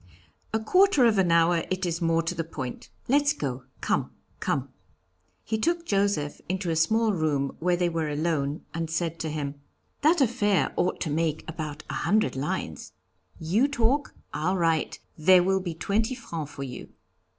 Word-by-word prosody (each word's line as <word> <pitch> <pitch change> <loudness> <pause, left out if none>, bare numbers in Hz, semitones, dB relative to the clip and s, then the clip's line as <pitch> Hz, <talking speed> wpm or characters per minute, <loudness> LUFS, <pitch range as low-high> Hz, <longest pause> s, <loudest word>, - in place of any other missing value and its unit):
A 220 - +1
quarter 365 - +4
of 220 -4 +4
an 180 -3 +3
hour, 165 0 +4
it 185 0 -1
is 170 0 -2
more 165 0 +2
to 165 - -2
the 165 -1 -2
point. 135 -6 -7 0.2
Let's 285 +3 +3
go. 130 - -4 0.2
Come, - - 0 0.3
come.' 135 0 -1 0.7
He 220 0 -2
took 340 +6 0
Joseph 195 - 0
into 185 -2 -1
a - - 0
small 220 +7 +3
room 150 -5 0
where 180 +2 +2
they 175 0 +2
were 165 -2 -1
alone, 150 -1 -1
and 165 -1 -3
said 165 0 -2
to 160 - -2
him: 145 -2 -4 0.4
'That 315 +4 +4
affair 215 -7 +2
ought 180 +1 0
to 155 - -1
make 160 0 -1
about 155 -2 -5
a - - -5
hundred 210 +2 +2
lines 135 +3 -4 0.5
you 200 - +2
talk 280 +1 0 0.2
I'll 180 +5 0
write 165 -3 +1 0.2
there 180 +3 +6
will 190 +1 +2
be 175 -3 -4
twenty 220 +9 0
francs 160 - -6
for 140 - -6
you.' 125 -2 -7
170 Hz, 175 wpm, -27 LUFS, 155-210 Hz, 0.7 s, there